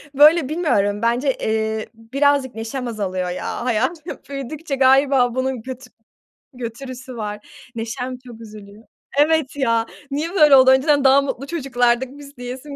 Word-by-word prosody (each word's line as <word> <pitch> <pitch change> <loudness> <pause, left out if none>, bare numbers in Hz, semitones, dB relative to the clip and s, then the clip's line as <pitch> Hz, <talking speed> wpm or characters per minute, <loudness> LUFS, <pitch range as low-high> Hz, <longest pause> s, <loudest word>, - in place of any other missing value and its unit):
böyle, 300 0 +6
bilmiyorum, 210 - 0
bence, 245 +4 +1
eee, 220 0 -2
birazcık 265 +3 0
neşem 230 +3 -5
azalıyor 185 -5 -3
ya, 180 +6 -4
hayat 255 +7 0 0.3
büyüdükçe 280 +2 -5
galiba 265 -2 +4
bunun 260 -2 -2
götü 255 0 -9 0.7
götürüsü 255 +1 -8
var. 210 -1 -6 0.3
Neşem 245 +3 -5
çok 235 -2 -11
üzülüyor. 210 0 -12 0.3
Evet 300 -2 +2
ya, 230 -4 +1 0.2
niye 315 +6 -3
böyle 300 -6 +7
oldu? 260 0 +7
Önceden 280 +2 +3
daha 275 +1 +6
mutlu 275 0 -4
çocuklardık 255 -5 0
biz, 285 -1 -13
diyesim 255 +4 -8
255 Hz, 135 wpm, -20 LUFS, 230-280 Hz, 0.7 s, böyle